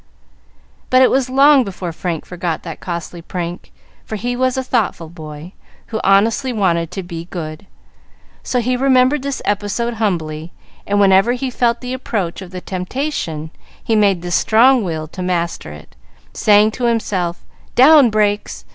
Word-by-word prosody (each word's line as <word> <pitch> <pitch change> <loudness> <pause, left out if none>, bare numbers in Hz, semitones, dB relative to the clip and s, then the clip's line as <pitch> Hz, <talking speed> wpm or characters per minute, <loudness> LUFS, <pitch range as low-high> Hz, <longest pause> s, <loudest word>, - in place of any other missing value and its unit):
But 255 0 +5
it - - +4
was 260 -1 +1
long 275 +1 +5
before 185 -4 -5
Frank 165 -1 -4
forgot 175 -2 -4
that 165 -3 -7
costly 170 -1 -6
prank; 175 0 -6 0.3
for 220 - -6
he 245 +4 -3
was 255 +1 0
a 260 - -1
thoughtful 195 -9 -1
boy, 155 +1 -10 0.4
who 220 - -1
honestly 225 +7 +3
wanted 170 -7 0
to 190 - -6
be 170 -1 -7
good; 160 -1 -7 0.7
so 250 - -1
he 250 +2 0
remembered 260 +2 +3
this 280 0 -4
episode 205 +4 -1
humbly, 160 -5 -2 0.3
and 205 0 +1
whenever 195 +4 +4
he 255 +1 -3
felt 235 -1 0
the 250 0 -4
approach 205 -9 -3
of 185 - -9 0.2
temptation 180 - -4 0.3
he 225 - +1
made 200 -5 +2
the 175 - -5
strong 235 +6 +4
will 160 -4 -4
master 170 - -2
it, 75 -3 -13 0.4
saying 210 0 +4
to 245 +2 -3
himself 195 -7 -1 0.3
"Down 275 0 +7
brakes!" 210 -1 -1
205 Hz, 155 wpm, -18 LUFS, 170-245 Hz, 0.7 s, Down